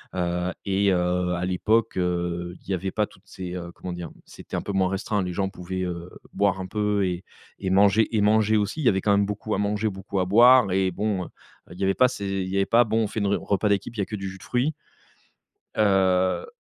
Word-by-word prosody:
heu 90 0 -1
et 100 0 +2
heu, 90 0 0
à 90 - -3
l'époque 105 +5 +1
heu, 90 -1 -2
il - - -15
y - - +2
avait 95 +1 -2
pas 105 +1 +1
toutes 95 +2 -22
ces 90 -2 -7
heu 85 -1 -6
comment 90 - -7
dire, 85 -2 -6
c'était - - -9
un - - -1
peu 100 - -5
moins 95 -1 +2
restreint, 100 +1 -1
les 90 -1 -4
gens 95 +1 -1
pouvaient, 95 0 -5
heu, 85 -1 -5 0.2
boire 100 -1 +1
un 95 - -5
peu 105 0 0
et 90 0 -3 0.5
manger 100 +4 +4
et 105 - +3
manger 110 +1 +3
aussi, 105 +8 -1
il - - -3
y - - +7
avait 95 -1 +1
quand 105 - +2
même 100 0 +3
beaucoup 105 +1 -3
à - - -1
manger, 105 +1 0
beaucoup 95 0 -4
à - - 0
boire 120 +2 +6
et 95 0 +1
bon, 100 -1 -2
heu, - - -9 0.4
il 90 - -11
y 100 - -1
avait 95 0 +2
pas 130 - +5
ces 110 -5 -5 0.2
il 95 - -5
y 95 - -3
avait 100 - +2 0.2
bon 110 +1 0
on - - 0
fait 110 - -4
une 100 - 0
re 100 - 0
repas 105 +1 0
d'équipe, 100 +3 -1
il - - -4
y - - +3
a - - -3
que 105 - -5
du 95 -1 -5
jus 95 - -9
de - - -16
fruit 125 +5 0 1.0
heu 95 - +2
95 Hz, 250 wpm, -25 LUFS, 90-105 Hz, 1.0 s, y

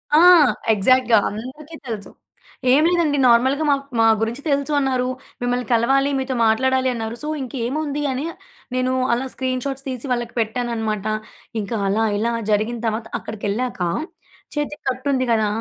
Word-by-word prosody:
ఆ! 310 - +7 0.5
ఎగ్జాక్ట్‌గా. 240 +3 +4
అందరికీ 260 +9 -8
తెలుసు. 215 -4 -5 0.6
ఏం 300 +3 +5
లేదండి 335 -5 +2
నార్మల్‍గా 260 +5 +4
మా 280 - +5 0.2
మా 225 - +5 0.2
గురించి 235 +5 -2
తెలుసు 280 +1 0
అన్నారు. 255 -2 0 0.3
మిమ్మల్ని 245 0 -1
కలవాలి, 270 +4 +3
మీతో 260 -1 -2
మాట్లాడాలి 260 +3 +2
అన్నారు. 225 0 -4
సో, - - -4
ఇంకేముంది 280 +4 -3
అని 260 +4 -3 0.5
నేను 255 0 +1 0.2
అలా 245 +3 -1
స్క్రీన్‌షాట్స్ 265 +1 -3
తీసి 255 0 -5
వాళ్ళకి 240 -1 -2
పెట్టాననమాట. 225 -2 -2 0.6
ఇంకా 215 +3 -3
అలా, 220 +3 +2
ఇలా 230 +3 0 0.2
జరిగిన 215 +3 0
తర్వాత 220 +1 -2
అక్కడికెళ్ళాక 215 +1 -3 0.7
చేతికి 295 +1 -3
కట్టు 260 +2 -2
ఉంది 255 -1 +1
కదా! 220 -2 +3
250 Hz, 140 wpm, -21 LUFS, 225-270 Hz, 0.7 s, ఆ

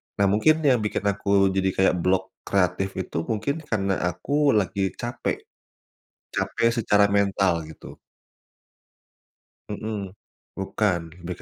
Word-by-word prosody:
nah 100 - +1
mungkin 155 +10 +3
yang 130 -5 +4
bikin 105 -1 -2
aku 100 -1 +2
jadi 95 0 0
kayak 95 -1 +4
blok 90 +2 +1 0.2
kreatif 95 0 +1
itu 90 - -6
mungkin 115 +6 -1
karena 100 -3 0
aku 140 - +1
lagi 100 -1 0
capek, 120 0 -3 1.0
capek 115 - +1
secara 105 -1 +4
mental 100 -4 +2
gitu. 80 - -12 1.7
Mhm, 105 -2 -5 0.4
bukan, 95 -4 -1
lebih 85 0 -5
100 Hz, 115 wpm, -24 LUFS, 95-110 Hz, 1.7 s, yang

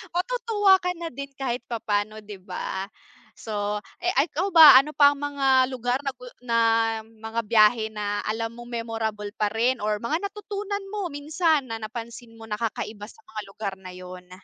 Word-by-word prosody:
matutuwa 420 -1 +3
ka 360 0 0
na 340 -1 -5
din 280 +1 -6
kahit 255 -2 -2
papaano, 215 -2 -2
'di 200 -3 -10
ba. 190 +1 -5 0.5
So, 210 -1 -2 0.2
eh, 360 - +2 0.2
ikaw 375 +6 -2
ba 320 -5 +10
ano 280 +3 +6
pa 285 -1 +5
ang - - -12
mga 270 -2 +2
lugar 250 +2 -1
na 275 - -1
gu 250 -1 -13 0.2
na 230 -1 0 0.5
mga 225 +1 -6
biyahe 220 0 +4
na 205 -1 -3
alam 225 +1 -2
mong 240 +1 -11
memorable 225 -3 -4
pa 210 - +2
rin 235 +4 +1
or 210 0 0
mga 320 +11 -1
natutunan 410 -1 -5
mo 410 -4 -2
minsan 305 0 0
na 225 - -3
napansin 230 +1 -8
mo 225 - -13
na 210 -1 -5
kakaiba 215 -2 -4
sa 445 - -18
mga 215 - -7
lugar 195 0 -5
na 185 -1 -10
yun? 180 0 -10
235 Hz, 180 wpm, -25 LUFS, 215-290 Hz, 0.5 s, ba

